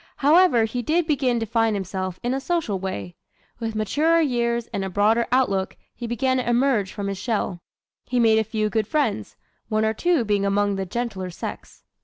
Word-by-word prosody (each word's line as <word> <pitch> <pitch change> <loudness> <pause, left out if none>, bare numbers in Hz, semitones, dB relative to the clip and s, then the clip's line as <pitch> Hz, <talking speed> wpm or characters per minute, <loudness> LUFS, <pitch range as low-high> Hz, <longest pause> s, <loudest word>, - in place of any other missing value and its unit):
However 300 -4 +5
he 245 +3 -3
did 325 +7 +1
begin 260 -6 +1
to 225 - -2
find 225 -1 +1
himself 185 -1 -4
in 245 +1 0
a 270 - -1
social 285 - -1
way. 100 - -5 0.4
With 225 -2 -3
maturer 300 +11 +2
years 235 -5 0
and 195 - -2
a 190 - -3
broader 215 +5 +2
outlook 200 -7 +1 0.2
he 235 - -6
began 260 +3 0
to 250 -1 -1
emerge 240 -5 +2
from 205 -1 -5
his 195 -1 -3
shell. 205 -6 -2 0.5
He 250 0 0
made 220 -2 +5
a - - +2
few 215 -1 -2
good 215 0 0
friends, 225 - -1 0.3
one 215 0 +1
or 220 - +1
two 330 0 +1
being 205 -1 +1
among 200 0 +1
the 190 -1 -3
gentler 200 -3 -3
sex. 175 - -8
225 Hz, 195 wpm, -23 LUFS, 200-255 Hz, 0.5 s, However